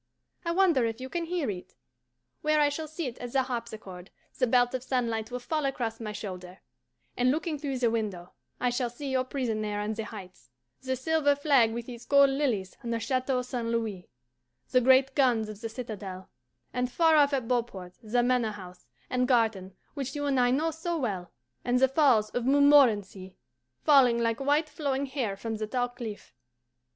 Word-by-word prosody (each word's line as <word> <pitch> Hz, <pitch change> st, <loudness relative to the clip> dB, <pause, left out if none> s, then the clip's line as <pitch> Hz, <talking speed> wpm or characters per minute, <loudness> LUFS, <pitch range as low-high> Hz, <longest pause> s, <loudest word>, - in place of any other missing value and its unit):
I 335 Hz, -, -1 dB
wonder 340 Hz, -7 st, +3 dB
if 225 Hz, +1 st, -5 dB
you 260 Hz, +1 st, -6 dB
can 340 Hz, +2 st, -2 dB
hear 330 Hz, -8 st, -1 dB
it? 180 Hz, -2 st, -9 dB, 0.7 s
Where 305 Hz, 0 st, +2 dB
I 295 Hz, -1 st, +4 dB
shall 310 Hz, +2 st, -4 dB
sit 300 Hz, -6 st, -5 dB
at 245 Hz, -1 st, -7 dB
the 265 Hz, -1 st, +3 dB
harpsichord 220 Hz, -7 st, -6 dB, 0.3 s
the 255 Hz, -, +3 dB
belt 245 Hz, +1 st, +3 dB
of 255 Hz, -, -2 dB
sunlight 235 Hz, -4 st, -1 dB
will 250 Hz, -, -4 dB
fall 305 Hz, +5 st, -2 dB
across 240 Hz, -5 st, -2 dB
my 220 Hz, -2 st, -5 dB
shoulder, 185 Hz, -3 st, -7 dB, 0.6 s
and, 245 Hz, +1 st, +2 dB
looking 310 Hz, +2 st, -1 dB
through 275 Hz, -2 st, -3 dB
the 240 Hz, -2 st, +2 dB
window, 200 Hz, -6 st, -3 dB, 0.3 s
I 250 Hz, -, +1 dB
shall 245 Hz, 0 st, -1 dB
see 270 Hz, +3 st, -6 dB
your 260 Hz, -1 st, +1 dB
prison 250 Hz, -5 st, -2 dB
there 210 Hz, -1 st, -2 dB
on 210 Hz, +1 st, -2 dB
the 220 Hz, 0 st, -4 dB
Heights; 185 Hz, -, -11 dB, 0.3 s
the 260 Hz, 0 st, -2 dB
silver 290 Hz, +2 st, +2 dB
flag 280 Hz, -6 st, +3 dB
with 235 Hz, +1 st, -5 dB
its 240 Hz, -1 st, -9 dB
gold 280 Hz, -1 st, +6 dB
lilies 245 Hz, -10 st, -1 dB
on 235 Hz, -, -5 dB
the 230 Hz, 0 st, -1 dB
Chateau 255 Hz, +1 st, 0 dB
St. 245 Hz, -2 st, -4 dB
Louis; 225 Hz, -6 st, -3 dB, 0.6 s
the 255 Hz, -, +4 dB
great 260 Hz, +2 st, +5 dB
guns 245 Hz, -6 st, +2 dB
of 215 Hz, 0 st, -9 dB
the 225 Hz, -, -4 dB
citadel; 210 Hz, -6 st, -7 dB, 0.4 s
and 250 Hz, 0 st, -1 dB
far 325 Hz, +1 st, +4 dB
off 290 Hz, -1 st, +5 dB
at 260 Hz, -5 st, -1 dB
Beauport 230 Hz, -7 st, -2 dB
the 240 Hz, +2 st, +1 dB
Manor 245 Hz, -3 st, +1 dB
House 180 Hz, -7 st, -12 dB, 0.2 s
and 250 Hz, 0 st, 0 dB
garden 220 Hz, -7 st, +1 dB, 0.2 s
which 275 Hz, -2 st, -5 dB
you 290 Hz, 0 st, -2 dB
and 275 Hz, -2 st, +1 dB
I 245 Hz, 0 st, +4 dB
know 305 Hz, +6 st, +1 dB
so 330 Hz, +2 st, -3 dB
well, 195 Hz, -, -3 dB, 0.3 s
and 245 Hz, 0 st, +1 dB
the 265 Hz, -, +5 dB
Falls 260 Hz, -7 st, +3 dB
of 245 Hz, -, -2 dB
Montmorenci, 240 Hz, -10 st, +4 dB, 0.5 s
falling 265 Hz, -6 st, +5 dB
like 230 Hz, 0 st, 0 dB
white 290 Hz, +3 st, +2 dB
flowing 280 Hz, -3 st, -2 dB
hair 255 Hz, -8 st, -3 dB
from 225 Hz, +2 st, -4 dB
the 215 Hz, 0 st, -3 dB
tall 245 Hz, +2 st, -1 dB
cliff. 235 Hz, -, -8 dB
245 Hz, 190 wpm, -28 LUFS, 220-275 Hz, 0.7 s, gold